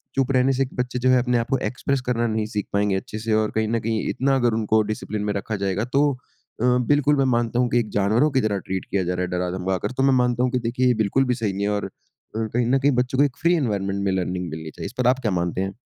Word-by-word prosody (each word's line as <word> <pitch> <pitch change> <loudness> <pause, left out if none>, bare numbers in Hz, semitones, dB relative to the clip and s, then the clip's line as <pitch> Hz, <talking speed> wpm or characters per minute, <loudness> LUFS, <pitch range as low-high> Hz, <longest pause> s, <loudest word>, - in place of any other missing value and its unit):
चुप 135 -1 +1
रहने 130 0 +3
से 135 +1 +1
एक 130 - -7
बच्चे 125 0 -2
जो 130 +1 +2
है 130 - +5
अपने 125 0 +1
आप 115 +1 -2
को 135 - +2
एक्स्प्रेस 135 +1 -1
करना 120 -1 0
नहीं 110 -1 -1
सीख 105 -1 -1
पाएँगे 100 -1 +1
अच्छे 105 +3 -5
से 110 0 -1
और 110 0 +1
कहीं 110 0 +1
न 115 +1 0
कहीं 110 0 -2
इतना 135 +1 +1
अगर 120 -3 +2
उनको 110 0 +2
डिसप्लिन 105 -1 -4
में 105 0 -1
रखा 105 +2 -3
जाएगा 95 +3 -1
तो 145 +1 +4
अ, 125 -2 -12 0.2
बिल्कुल 145 0 +3
मैं 135 - +3
मानता 120 0 0
हूँ 125 -1 +2
कि 120 - +2
एक 110 -3 -2
जानवरों 110 +9 +3
की 135 -1 +2
तरह 105 -3 0
ट्रीट 95 0 -2
किया 100 -1 -1
जा 90 +1 -1
रहा 90 - -2
है - - -2
डरा-धमका 90 +1 -1
कर। - - -7
तो 135 - +2
मैं 135 0 +4
मानता 125 -1 +2
हूँ 125 - +1
कि 125 - 0
देखिए, 125 +2 0
ये 125 - +4
बिल्कुल 130 +7 +1
भी 125 -1 0
सही 110 -5 -2
नहीं 100 +1 -3
है - - 0
और 105 0 -1
अ, - - -6 0.5
कहीं 115 +2 -1
न 135 +2 +3
कहीं 140 +2 +3
बच्चों 130 +1 -3
को - - +7
एक 140 -1 -4
फ्री 170 +2 +3
एनवायरनमेंट 100 - -1
में 100 - +1
लर्निंग 90 -1 -2
मिलनी 80 0 -6
चाहिए। - - -8
इस 100 - -6
पर 125 -1 +1
आप 130 +1 +3
क्या 110 -5 -1
मानते 90 0 -1
हैं? 95 0 -3
115 Hz, 295 wpm, -23 LUFS, 100-125 Hz, 0.5 s, को